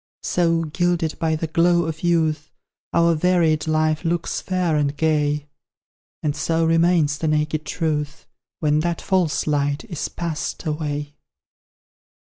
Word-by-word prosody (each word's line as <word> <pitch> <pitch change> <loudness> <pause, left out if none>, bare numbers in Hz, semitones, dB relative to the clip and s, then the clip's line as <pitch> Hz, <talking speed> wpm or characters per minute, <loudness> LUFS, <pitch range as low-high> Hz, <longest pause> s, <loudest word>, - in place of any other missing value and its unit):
So, 165 -2 +1
gilded 165 0 -1
by 160 -1 +1
the 155 - -2
glow 170 +2 +3
of 160 -1 -4
youth, 160 -3 +1 0.4
Our 170 0 +4
varied 165 -2 +2
life 155 0 +1
looks 170 0 -1
fair 180 -4 0
and 145 -1 0
gay; 150 -2 +1 0.8
And 150 -2 0
so 165 +1 0
remains 165 -2 +3
the 160 - -1
naked 155 0 0
truth, 150 -2 -2 0.4
When 150 -1 +2
that 170 +1 -1
false 180 -7 0
light 145 +2 0
is 170 -9 -4
past 170 0 -4
away. 150 -1 -3
160 Hz, 130 wpm, -22 LUFS, 150-170 Hz, 0.8 s, Our